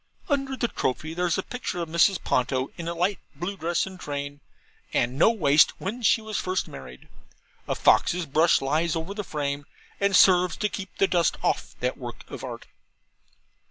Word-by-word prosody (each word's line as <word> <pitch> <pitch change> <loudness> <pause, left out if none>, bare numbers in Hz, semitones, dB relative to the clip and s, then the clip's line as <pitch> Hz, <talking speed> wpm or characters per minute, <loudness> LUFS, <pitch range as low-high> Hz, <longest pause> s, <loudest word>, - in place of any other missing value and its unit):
Under 275 -2 0
the 235 - +1
trophy 155 - -2
there's 175 -1 0
a 190 - -1
picture 250 -7 -5
of 170 - -2
Mrs. 170 +4 +3
Ponto, 130 +1 0
in 170 - -6
a 170 - -3
light 180 +3 0 0.2
blue 175 +7 -4
dress 170 -1 0
and 190 -1 -10
train, 145 -1 -5 0.5
and 120 +2 +1
no 155 - +5
waist, 155 -10 +4
when 220 +6 -4
she 225 0 +4
was 215 -1 -3
first 185 0 -1
married; 65 -1 -11 0.6
a - - -1
fox's 175 -1 +3
brush 160 +4 +3
lies 155 +4 +1
over 165 +4 -4
the 210 0 -4
frame, 145 -4 -3 0.3
and 200 -1 +2
serves 180 -1 +5
to 210 -2 0
keep 190 -2 -7
the - - +4
dust 175 -4 +1
off - - -1
that - - -1
work - - -8
of - - -7
art. - - -7
170 Hz, 185 wpm, -26 LUFS, 150-195 Hz, 0.6 s, no